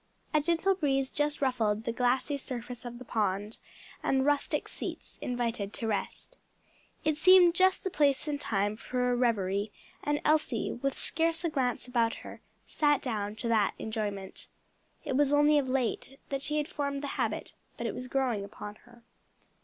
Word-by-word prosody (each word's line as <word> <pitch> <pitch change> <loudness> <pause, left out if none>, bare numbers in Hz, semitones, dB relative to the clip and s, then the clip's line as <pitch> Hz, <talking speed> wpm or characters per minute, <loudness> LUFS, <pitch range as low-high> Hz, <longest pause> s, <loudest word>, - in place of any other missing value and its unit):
A 305 - +4
gentle 340 +5 +2
breeze 270 -7 0
just 295 -1 0
ruffled 225 -5 +1
the 230 - -1
glassy 250 +4 +1
surface 250 -3 -6
of 240 0 -6
the 255 - -10
pond, 210 -1 -1 0.4
and 265 0 +2
rustic 290 -1 +2
seats - - -6
invited 230 -5 -2
to 230 - -4
rest. 210 -3 -3 0.7
It 310 -1 +2
seemed 360 +1 +7
just 375 +1 +3
the 380 - -2
place 285 -2 +2
and 290 -1 -2
time 205 0 0
for 250 +1 -1
a - - +2
reverie, 205 -4 +1 0.3
and 295 0 +1
Elsie, 300 -7 +2
with 275 +2 -2
scarce 330 +1 +1
a 335 - +1
glance 255 -5 -1
about 235 -2 +1
her, - - -9 0.2
sat 295 -2 +2
down 210 -4 -2
to 235 - -4
that 215 -3 +2
enjoyment. 205 -3 -4 0.6
It 265 - -1
was 285 0 +3
only 295 +1 +5
of 265 -2 -2
late 265 +1 -1
that 275 -1 -2
she 300 +2 -1
had 300 0 0
formed 280 -5 -3
the - - -2
habit, - - -2 0.2
but - - -4
it - - -1
was 255 - -5
growing 250 -6 0
upon 205 +1 -8
her. 240 -1 -18
255 Hz, 175 wpm, -30 LUFS, 225-290 Hz, 0.7 s, seemed